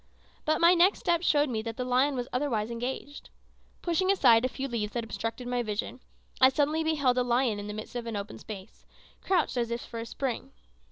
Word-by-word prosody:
But 310 Hz, 0 st, +2 dB
my 340 Hz, +1 st, +7 dB
next 360 Hz, +3 st, +4 dB
step 340 Hz, -1 st, +2 dB
showed 295 Hz, -4 st, +3 dB
me 225 Hz, -4 st, -2 dB
that 225 Hz, 0 st, -6 dB
the 250 Hz, -, -2 dB
lion 260 Hz, +3 st, +2 dB
was 245 Hz, -1 st, -3 dB
otherwise 240 Hz, -5 st, -1 dB
engaged. 255 Hz, +4 st, -5 dB, 0.5 s
Pushing 370 Hz, +2 st, +1 dB
aside 235 Hz, -12 st, +5 dB
a 255 Hz, -, +1 dB
few 270 Hz, +1 st, -4 dB
leaves 220 Hz, -4 st, -3 dB
that 235 Hz, -, -2 dB
obstructed 225 Hz, +3 st, -4 dB
my 245 Hz, 0 st, 0 dB
vision, 215 Hz, +3 st, -3 dB, 0.4 s
I 260 Hz, -, +9 dB
suddenly 300 Hz, +4 st, +1 dB
beheld 285 Hz, -6 st, +2 dB
a -, -, +3 dB
lion 240 Hz, -3 st, +1 dB
in 205 Hz, -, -6 dB
the 210 Hz, -, -5 dB
midst 215 Hz, +3 st, -8 dB
of 240 Hz, -1 st, -4 dB
an 225 Hz, -, -3 dB
open 200 Hz, +1 st, -5 dB
space, 195 Hz, -3 st, -10 dB, 0.4 s
crouched 370 Hz, -8 st, +1 dB
as 235 Hz, -1 st, 0 dB
if 235 Hz, +1 st, -3 dB
for 230 Hz, -, -7 dB
a 230 Hz, -, -4 dB
spring. 260 Hz, 0 st, -4 dB
250 Hz, 215 wpm, -29 LUFS, 230-290 Hz, 0.5 s, I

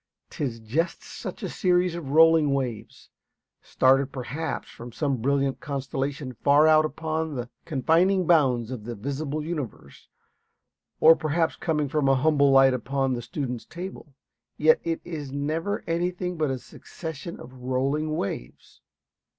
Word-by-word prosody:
'Tis 125 Hz, -6 st, -3 dB
just 135 Hz, +11 st, -2 dB
such -, -, -8 dB
a -, -, -1 dB
series 180 Hz, -3 st, +1 dB
of 170 Hz, -5 st, -6 dB
rolling 160 Hz, -1 st, +5 dB
waves; 125 Hz, -6 st, -5 dB, 0.5 s
started 135 Hz, +1 st, +2 dB
perhaps 140 Hz, +5 st, -4 dB
from 120 Hz, +1 st, -10 dB
some 140 Hz, +2 st, -1 dB
brilliant 135 Hz, +2 st, 0 dB
constellation 135 Hz, -1 st, -4 dB
far 145 Hz, +5 st, +4 dB
out 155 Hz, 0 st, +5 dB
upon 160 Hz, 0 st, -3 dB
the 120 Hz, -1 st, -5 dB
confining 175 Hz, +6 st, +2 dB
bounds 130 Hz, -8 st, +3 dB
of 125 Hz, -5 st, -6 dB
the 120 Hz, +2 st, -6 dB
visible 140 Hz, +6 st, -3 dB
universe, 140 Hz, -, -6 dB, 0.9 s
or 160 Hz, +1 st, +8 dB
perhaps 160 Hz, +1 st, 0 dB
coming 150 Hz, -3 st, -1 dB
from 140 Hz, 0 st, +1 dB
a 135 Hz, -, +5 dB
humble 140 Hz, +1 st, +3 dB
light 135 Hz, -1 st, +6 dB
upon 135 Hz, +1 st, -1 dB
the 120 Hz, -, -3 dB
student's 125 Hz, -3 st, -5 dB
table; 175 Hz, -5 st, -9 dB, 0.4 s
yet 160 Hz, +1 st, +5 dB
it 165 Hz, -1 st, -1 dB
is 150 Hz, -5 st, -6 dB
never 155 Hz, +8 st, -2 dB
anything 180 Hz, +2 st, -2 dB
but 155 Hz, -3 st, 0 dB
a 130 Hz, -, -1 dB
succession 160 Hz, +5 st, -8 dB
of 130 Hz, -, -11 dB
rolling 135 Hz, +5 st, -1 dB
waves. 100 Hz, -, -6 dB
145 Hz, 140 wpm, -26 LUFS, 130-160 Hz, 0.9 s, or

